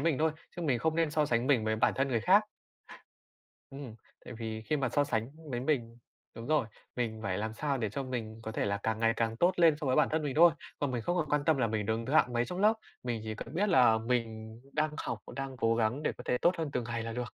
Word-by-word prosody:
mình 155 -2 +1
thôi, 160 +1 +3 0.3
chứ 175 - -4
mình 130 -7 +1
không 160 +5 0
nên 165 -2 +2
so 150 -1 +1
sánh 120 0 +1
mình 130 -6 +3
với 110 0 0
bản - - +3
thân 135 +2 +1
người 115 -4 +1
khác. 200 - +5 1.3
Ừm, 135 -5 -8 0.3
tại - - -8
vì 110 -1 -5
khi 150 +7 -1
mà 130 -3 0
so 145 +4 +2
sánh 115 -3 -1 0.2
với 120 - -1
mình 120 -4 -1 0.4
đúng 115 - -7
rồi, 150 -7 +2 0.3
mình 115 -3 -2
phải 95 -1 -1
làm 110 +1 -3
sao 140 +3 -1
để 110 -4 -1
cho 135 +7 -4
mình 115 -4 -5
có 110 - -4
thể - - -1
là 100 0 0
càng 110 0 -1
ngày 115 0 +3
càng 115 0 -1
tốt 180 +5 +3
lên 165 -3 +6
so 140 - -1
với 130 - +2
bản 150 - +4
thân 155 0 0
mình 140 -3 -2
thôi. 170 +2 +8 0.3
Còn 145 -2 -1
mình 120 -2 -2
không 175 +9 -1
còn 155 -3 -1
quan 145 -1 +1
tâm 160 -4 +3
là 115 -3 +2
mình 105 -1 -2
đứng 110 +2 -1
thứ 135 - -3
hạng 125 -6 +4
mấy 120 0 +1
trong 180 +1 -5
lớp, 215 +2 +5 0.3
mình 120 -3 -2
chỉ 110 0 -4
cần 115 +3 -8
biết 205 +5 +1
là 125 -10 +5
mình 110 -1 -3
đang 155 0 +1
học, - - -3
và - - -9
đang 135 -2 -5
cố 115 0 +2
gắng 120 +6 0
để - - +1
có - - -9
thể 125 - +2
tốt 175 - +3
hơn 160 -2 -2
từng 125 - -1
ngày 115 0 -3
là 115 0 -5
được. 125 - -3
125 Hz, 280 wpm, -31 LUFS, 115-150 Hz, 1.3 s, thôi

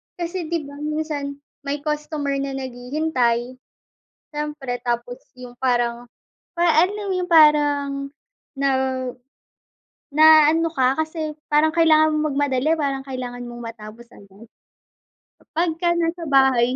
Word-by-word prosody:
kasi, 345 -1 -4
'di 335 -2 -2
ba, 285 +1 -11
minsan 300 -2 -3 0.3
may 285 +1 -3
customer 300 -2 -2
na 275 -1 -3
naghihintay, 250 -1 -1 0.8
siyempre. 295 -5 -4
Tapos 240 0 -2 0.2
'yung 245 -1 -10
parang, 240 -1 0 0.5
para 340 -3 +3
alam 400 +3 -3
mo 380 - -1
'yung 360 -1 -3
parang, 290 -3 +4 0.5
na 275 0 +1 1.4
naano 315 +2 +6
ka, 260 +1 +2
kasi 315 -1 -3
parang 305 +1 +3
kailangan 315 -1 +4
mong 305 0 0
magmadali, 285 +2 +1
parang 275 -3 -3
kailangan 245 -2 -6
mong 240 0 -9
matapos 225 +1 -12
agad. 200 +3 -16 0.9
Kapagka 345 +1 -1
nasa 335 0 -1
bahay, 260 -3 +3
285 Hz, 120 wpm, -22 LUFS, 250-315 Hz, 1.4 s, naano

